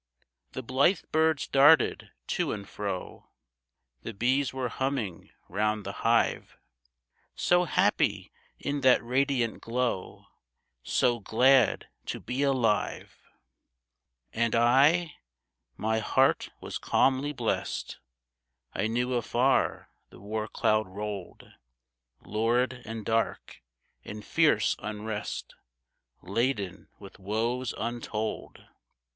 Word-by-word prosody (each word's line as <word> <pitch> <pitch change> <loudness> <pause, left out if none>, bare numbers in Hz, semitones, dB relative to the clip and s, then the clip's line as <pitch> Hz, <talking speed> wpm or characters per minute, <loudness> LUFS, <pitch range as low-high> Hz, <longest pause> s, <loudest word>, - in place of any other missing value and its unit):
The 130 - -5
blithe 135 +10 +2
birds 160 -1 +2
darted 145 +3 +4 0.2
to - - 0
and 100 -2 -7
fro, 100 -3 -6 0.7
The 115 - -7
bees 130 +5 +1
were 130 -1 -2
humming 125 -8 -3 0.2
round 105 +2 -1
the - - -3
hive, - - +1 0.8
So 175 0 +3
happy - - +1 0.3
in 145 0 -3
that 130 -2 +5
radiant 125 -1 0
glow! 120 -5 -3 0.6
So 120 - +1
glad 125 +2 +3 0.2
to - - -4
be 125 +2 -4
alive! 130 -7 0 1.1
And 115 0 +1
I? 140 +8 +4 0.6
My 110 +1 0
heart 110 - +2
was - - -5
calmly 135 +2 +2
blest. 120 -6 -3 0.7
I 110 - 0
knew 125 +3 -1
afar 125 +2 +1 0.2
the - - -15
war 110 +2 -4
cloud 110 -1 +1
rolled 100 -1 -7 0.8
Lurid 120 +4 0
and 110 -1 -6
dark, 115 +1 -2 0.4
in 105 0 -8
fierce - - +2
unrest, 105 0 -5 0.7
Laden 100 -1 -2
with 100 - -13
woes 115 +5 -2
untold. 110 -2 -4
115 Hz, 100 wpm, -28 LUFS, 105-130 Hz, 1.1 s, that